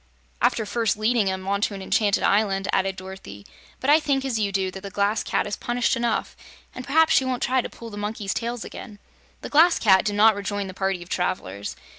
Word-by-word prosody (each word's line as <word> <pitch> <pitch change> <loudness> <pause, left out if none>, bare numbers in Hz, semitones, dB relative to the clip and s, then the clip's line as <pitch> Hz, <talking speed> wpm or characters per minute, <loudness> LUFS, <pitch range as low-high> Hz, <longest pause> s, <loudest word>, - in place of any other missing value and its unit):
"After 220 - +2
first 220 0 0
leading 215 -2 +2
'em 190 0 -4
onto 200 +1 0
an 195 - -7
enchanted 205 +1 +1
island," 195 -2 +2
added 195 0 +1
Dorothy. 185 - -10 0.3
"But 275 - +2
I 305 - +7
think, 275 -3 0
as 245 -5 -1
you 205 -2 0
do, 190 -1 -1
that 190 - -9
the 200 - -7
Glass 200 +2 0
Cat - - -1
is 205 - -3
punished 240 0 0
enough, 235 -1 -1 0.4
and 255 - -8
p'raps 320 +3 +4
she - - +4
won't 255 -1 -2
try 260 +1 +2
to - - -6
pull 230 -1 -11
the 205 - -8
monkeys' 205 -1 -3
tails 235 -1 -4
again." 210 -4 -9 0.4
The - - -7
Glass 330 +4 +5
Cat 190 -3 +4
did 205 - -1
not 215 +2 +6
rejoin 205 0 -3
the 190 - -7
party 190 -2 -2
of 175 - -18
travelers. 100 - -3
205 Hz, 220 wpm, -24 LUFS, 195-235 Hz, 0.4 s, I